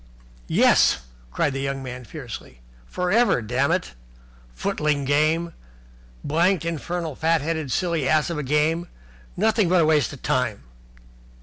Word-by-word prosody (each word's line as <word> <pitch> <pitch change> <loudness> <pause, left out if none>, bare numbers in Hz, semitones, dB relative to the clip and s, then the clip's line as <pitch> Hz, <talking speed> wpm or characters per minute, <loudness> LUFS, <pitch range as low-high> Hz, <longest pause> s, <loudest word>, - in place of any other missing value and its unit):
"Yes!" - - +4 0.3
cried 140 - 0
the 135 - -3
young 135 0 -3
man 125 -1 -7
fiercely. 115 - -9 0.3
"For 180 - -2
ever, 235 - +4
dammit! 135 - 0 0.6
Footling 145 - -1
game! 155 +4 +1 0.7
Blanked 170 +4 +1
infernal 170 0 -3
fat 160 +1 +1
headed 160 -2 -3
silly 165 -6 0
ass 155 +2 +2
of 160 - -3
a - - -1
game! 150 +5 +1 0.5
Nothing 215 -1 +2
but 180 0 +4
a - - +4
waste 150 -5 +2
of 140 - -11
time." 125 - -1
155 Hz, 135 wpm, -23 LUFS, 135-170 Hz, 0.7 s, Yes